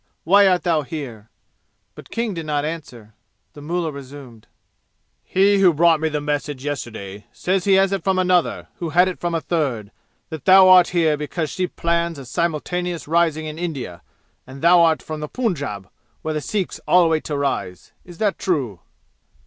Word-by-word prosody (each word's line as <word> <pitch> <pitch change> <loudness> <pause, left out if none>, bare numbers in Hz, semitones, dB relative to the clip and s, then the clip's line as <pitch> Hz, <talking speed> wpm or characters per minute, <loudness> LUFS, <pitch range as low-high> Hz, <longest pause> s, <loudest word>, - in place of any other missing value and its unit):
Why 200 +4 +5
art 180 -1 +2
thou 165 -4 +2
here?" 125 -7 -8 0.6
But - - -13
King 230 -2 -2
did 165 -3 -6
not 145 -1 -1
answer. 125 -9 -7 0.4
The 145 - -12
mullah 165 +1 -2
resumed. 135 -5 -11 0.8
"He 195 +2 +3
who 180 -4 +5
brought 165 0 +4
me 160 +1 0
the 150 -1 -2
message 145 -2 -3
yesterday 110 -8 -6
says 185 0 -1
he 200 - +4
has 195 0 +4
it 195 -4 -2
from 190 0 +1
another, 180 -2 +1
who 170 - -4
had 175 +4 +4
it 185 - -4
from 175 -1 -2
a 165 - -1
third, 130 -13 -2 0.4
that 160 -4 -8
thou 190 0 +7
art 180 -1 +7
here 160 -4 +1
because 150 +2 -4
she 185 -1 -2
plans 170 -1 -1
a 135 - -9
simultaneous 170 +3 -2
rising 160 -1 +1
in 155 +1 -6
India, 135 - -5 0.5
and 135 +2 -11
thou 175 +1 +6
art 165 -2 +3
from 155 -1 -6
the 150 -1 -5
Punjab 140 - -3 0.4
where 155 - -2
the 150 - -2
Sikhs 195 +6 -3
all 180 -2 +5
wait 160 -1 0
to 150 - -3
rise. 135 -10 -3
Is 175 -2 -13
that 205 -1 0
true?" 135 - -1
160 Hz, 180 wpm, -21 LUFS, 145-180 Hz, 0.8 s, thou